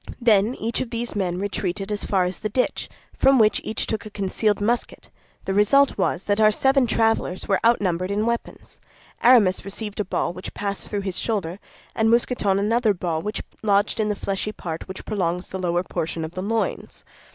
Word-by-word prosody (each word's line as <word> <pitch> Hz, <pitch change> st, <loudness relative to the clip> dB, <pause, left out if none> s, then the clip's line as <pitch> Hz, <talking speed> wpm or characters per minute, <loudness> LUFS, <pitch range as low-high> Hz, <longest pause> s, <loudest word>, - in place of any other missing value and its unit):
Then 225 Hz, 0 st, +3 dB
each 230 Hz, +1 st, -2 dB
of 255 Hz, -, -4 dB
these 235 Hz, -1 st, -3 dB
men 180 Hz, -3 st, -1 dB
retreated 195 Hz, 0 st, -3 dB
as 205 Hz, -, -2 dB
far 190 Hz, -2 st, +2 dB
as 180 Hz, +1 st, -3 dB
the 215 Hz, -, -3 dB
ditch, 250 Hz, +5 st, -1 dB, 0.3 s
from 270 Hz, 0 st, +4 dB
which 215 Hz, -2 st, +4 dB
each 220 Hz, -, -2 dB
took 220 Hz, -2 st, -3 dB
a 215 Hz, -, -8 dB
concealed 205 Hz, +1 st, 0 dB
musket; 230 Hz, +4 st, -2 dB, 0.4 s
the 195 Hz, -, -1 dB
result 265 Hz, +8 st, +4 dB
was 190 Hz, -2 st, 0 dB
that 205 Hz, +1 st, 0 dB
our 215 Hz, -, +7 dB
seven 265 Hz, +4 st, +2 dB
travelers 225 Hz, -5 st, 0 dB
were 195 Hz, -, +2 dB
outnumbered 185 Hz, -6 st, +2 dB
in 205 Hz, +2 st, 0 dB
weapons. 235 Hz, 0 st, -4 dB, 0.4 s
Aramis 225 Hz, -7 st, +5 dB
received 205 Hz, +2 st, -6 dB
a -, -, +2 dB
ball 185 Hz, -, -2 dB
which 185 Hz, -, -8 dB
passed 200 Hz, -1 st, -4 dB
through 205 Hz, -1 st, -3 dB
his 190 Hz, -2 st, -2 dB
shoulder, 195 Hz, -5 st, -2 dB, 0.4 s
and 220 Hz, 0 st, +2 dB
Mousqueton 230 Hz, -4 st, +2 dB
another 215 Hz, +1 st, +2 dB
ball 170 Hz, -3 st, -2 dB
which 210 Hz, +3 st, -4 dB, 0.2 s
lodged 205 Hz, 0 st, +2 dB
in 215 Hz, -1 st, +1 dB
the 210 Hz, -, 0 dB
fleshy 200 Hz, +1 st, -3 dB
part 165 Hz, -6 st, -6 dB
which 190 Hz, 0 st, -8 dB
prolongs 180 Hz, -4 st, -2 dB
the 190 Hz, -, -5 dB
lower 175 Hz, -1 st, 0 dB
portion 165 Hz, -2 st, -3 dB
of 160 Hz, -, -7 dB
the 185 Hz, +1 st, -5 dB
loins. 225 Hz, +3 st, -3 dB
205 Hz, 195 wpm, -23 LUFS, 185-225 Hz, 0.4 s, our